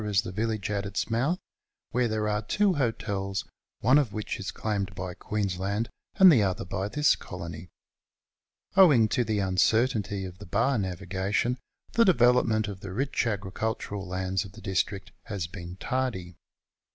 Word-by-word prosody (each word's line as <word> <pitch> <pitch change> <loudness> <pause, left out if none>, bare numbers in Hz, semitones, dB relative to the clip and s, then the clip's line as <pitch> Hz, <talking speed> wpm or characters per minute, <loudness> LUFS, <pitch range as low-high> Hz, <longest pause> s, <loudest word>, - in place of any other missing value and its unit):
Coolougatta 105 - -3
is - - +6
the - - -5
village 110 0 -2
at 100 -1 -1
its 100 +2 -3
mouth, 135 +10 +1 0.5
where 125 0 +2
there 110 -1 -1
are 105 0 0
two 200 - +2
hotels, 100 - -1 0.4
one 130 +6 +6
of 135 -8 0
which 105 -1 -4
is 95 - -4
claimed 100 -3 -2
by 90 -1 -4
Queensland 100 +2 -2 0.3
and 190 -3 +9
the 125 -8 +5
other 95 -3 0
by 100 0 -2
this 150 +6 +3
Colony. 85 +1 -8 1.1
Owing 150 - +7
to 125 - +2
the 110 -2 -1
uncertainty 100 +1 +1
of 90 0 -9
the 105 - -10
bar 115 +7 +2
navigation 95 +6 -1 0.3
the 230 - +5
development 120 - +4
of 100 -2 -6
the 95 -1 -7
rich 135 +4 0
agricul 105 +1 -2
tural 100 -1 -6
lands 95 +1 -1
of 100 -1 -12
the 110 - -12
district 95 0 -2
has 100 -5 -3
been 85 0 -8
tardy. 95 -6 -2
105 Hz, 165 wpm, -28 LUFS, 95-115 Hz, 1.1 s, and